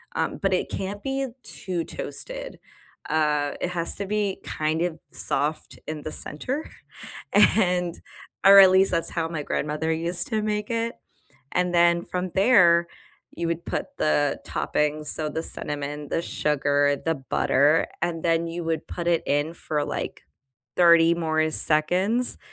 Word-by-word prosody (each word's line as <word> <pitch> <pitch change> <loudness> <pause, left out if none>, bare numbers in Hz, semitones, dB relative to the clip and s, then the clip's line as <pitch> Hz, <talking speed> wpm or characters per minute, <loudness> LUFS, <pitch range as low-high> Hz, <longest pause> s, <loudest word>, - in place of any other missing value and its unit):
um, - - -1
but - - +1
it - - -1
can't 200 +1 -5
be 270 0 -2 0.2
too 180 -3 -3
toasted, - - -5 0.5
uh, 150 -2 +1
it 180 - -1
has 170 -2 -1
to 200 - -3
be, 205 -1 -1
kind 155 +1 -2
of, 175 -2 -1
soft 150 +2 -2
in 155 -1 -5
the 155 - -5
center 260 - -2 0.6
and 180 -4 +3 0.4
or 195 0 +10
at 190 -1 +9
least 190 +1 +4
that's 165 -2 +3
how 165 -1 -1
my 165 -2 -4
grandmother 150 +3 -2
used 170 +2 -2
to 220 -2 -1
make 210 0 -2
it, 230 +1 -2 0.6
and 180 0 0
then 170 0 +4
from 180 +1 -4
there, 180 -5 +5 0.5
you 170 - -2
would 170 0 -3
put - - -2
the 145 -2 +1
toppings; 150 0 -1
so 155 0 0
the 160 +2 -4
cinnamon, 145 -1 -3
the 165 - -1
sugar, 145 -2 +1
the 165 - +1
butter, 145 +2 +2 0.2
and 170 -2 -2
then 165 0 +1
you 170 +1 -5
would 160 -1 -2
put 170 - -5
it 170 -1 +2
in 145 +3 0
for, 150 -3 -2
like, - - -5 0.5
30 170 -1 +6
more 155 -2 0
seconds 180 +11 +2
170 Hz, 155 wpm, -24 LUFS, 155-185 Hz, 0.6 s, or